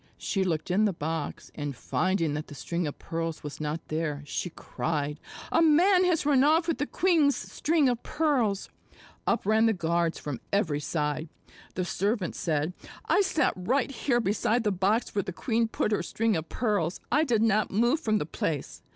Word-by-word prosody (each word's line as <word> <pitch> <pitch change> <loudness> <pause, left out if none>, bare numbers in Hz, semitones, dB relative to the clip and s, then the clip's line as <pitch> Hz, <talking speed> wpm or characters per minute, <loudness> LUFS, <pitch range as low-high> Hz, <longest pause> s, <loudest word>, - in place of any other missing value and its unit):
She 195 -3 -1
looked 165 -2 -1
in 205 +4 +3
the 205 - +1
box, 160 -1 -4
and 145 -3 -4
finding 170 +3 0
that 150 +1 -4
the 145 - -10
string 170 +3 -2
of 145 - -6
pearls 165 -1 -4
was 150 +1 -7
not 155 +2 -3
there, 155 -2 -2
she 180 - -3
cried, 150 -3 -3 0.3
"A 330 - +4
man 360 +4 +5
has 345 -5 +1
run 275 -3 +4
off 320 +3 +4
with 330 - 0
the 290 - -1
queen's 325 -6 +3
string 310 -2 +1
of 245 -2 0
pearls." 255 -11 0 0.6
Up - - +1
ran 220 +2 +4
the 225 - +3
guards 170 -2 0
from 145 -5 -5
every 165 -8 +1
side. 150 +1 -2 0.5
The 185 - -1
servant 200 +1 -1
said: 155 +1 -1 0.3
"I 405 - +3
sat 325 -8 +2
right 255 +10 0
here 250 -2 +1
beside 225 +2 +1
the 210 - +2
box 195 +5 +1
where 200 - +1
the 185 - -5
queen 230 +4 0
put 220 - -1
her 210 - +1
string 225 -1 0
of 160 0 -3
pearls. 205 -7 0
I 305 - +4
did 235 -7 +2
not 215 -1 +2
move 240 +9 +2
from 215 -8 +1
the 150 - -2
place. 150 -2 -3
200 Hz, 190 wpm, -28 LUFS, 160-250 Hz, 0.6 s, man